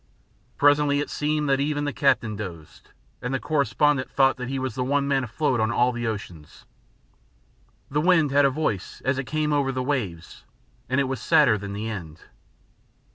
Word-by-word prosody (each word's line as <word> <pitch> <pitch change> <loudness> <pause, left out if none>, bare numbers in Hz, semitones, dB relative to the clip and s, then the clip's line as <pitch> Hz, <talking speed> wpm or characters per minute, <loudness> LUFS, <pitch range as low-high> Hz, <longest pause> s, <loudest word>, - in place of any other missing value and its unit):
Presently 145 0 +4
it 145 - -3
seemed 150 0 -1
that 135 -1 +2
even 145 +1 -1
the 145 -1 -2
captain 130 -6 +1
dozed, 85 -7 -9 0.3
and 125 +1 -2
the - - -1
correspondent 145 -1 +1
thought 135 -1 +3
that 125 0 -5
he 135 - -2
was 130 -3 -3
the 125 - -2
one 140 +2 0
man 135 -2 +1
afloat 125 +1 -1
on 110 +1 +1
all 120 +1 +2
the 120 -1 -3
oceans. 90 -8 -7 1.3
The 150 +2 +1
wind 165 -4 +3
had 145 +1 +4
a - - +5
voice 130 - -3
as 130 +1 +1
it 135 - -3
came 155 +1 -1
over 140 -2 +1
the 130 -1 -3
waves, 105 - -4 0.5
and 130 +2 +1
it - - +3
was 130 -1 -4
sadder 110 - +4
than 100 -1 -6
the 105 +2 -4
end. 85 -7 -7
135 Hz, 185 wpm, -24 LUFS, 110-145 Hz, 1.3 s, a